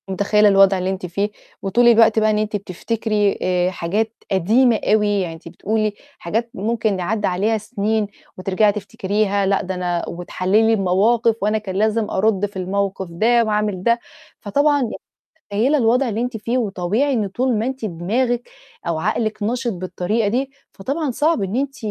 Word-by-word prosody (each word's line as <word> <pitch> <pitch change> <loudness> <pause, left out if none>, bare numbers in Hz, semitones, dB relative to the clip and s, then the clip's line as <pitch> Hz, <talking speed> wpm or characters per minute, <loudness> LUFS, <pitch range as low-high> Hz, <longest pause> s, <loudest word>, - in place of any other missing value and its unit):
متخيّلة 205 +2 +3
الوضع 195 -1 +5
اللي 185 0 -2
أنتِ 190 -1 -3
فيه، 200 +4 -2 0.3
وطول 235 +5 +3
الوقت 225 -1 +6
بقى 215 0 +3
إن 215 - +2
أنتِ 215 0 -1
بتفتكري 205 +1 -1
آآ، 180 0 +1
حاجات 205 +6 -2 0.2
قديمة 220 +5 +3
أوي، 210 -1 +2
يعني 170 -3 -3
أنتِ 165 +1 -13
بتقولي 215 +4 -1 0.3
حاجات 225 +7 -2
ممكن 220 -1 -1
ن - - -5
عدّى 210 +3 -1
عليها 205 +5 +1
سنين 215 0 -1 0.3
وترجعي 195 +3 +2
تفتكريها، 200 0 -1
لأ 195 0 +2
ده 190 -2 -4
أنا 175 -1 -2
وتحلِّلي 190 +5 +1
المواقف 215 +4 +2
وأنا 210 +2 +1
كان 200 -3 -6
لازم 215 +1 +1
أرُدّ 205 0 +1
في 205 -1 -8
الموقف 190 0 -2
ده 230 +7 +3
وأعمل 210 -4 -1
ده، 235 +2 +3 0.4
فطبعًا 285 +7 +2 0.7
متخيّلة 255 +9 +2
الوضع 250 +2 +2
اللي 220 0 -2
أنتِ 245 -1 -2
فيه، 230 +4 -1
وطبيعي 215 +5 0
إن 215 -6 0
طول 245 +5 0
ما 220 - -1
أنتِ 260 -2 -4
دماغِك 230 +7 -1 0.4
أو 170 -2 -1
عقلِك 215 +4 -1
نشِط 240 +2 -1
بالطريقة 185 +4 -1
دي، 260 +5 -1 0.2
فطبعًا 280 +9 -3
صعب 300 +2 +1
إن 195 +3 -2
أنتِ 275 +1 -2
210 Hz, 165 wpm, -20 LUFS, 190-230 Hz, 0.7 s, الوقت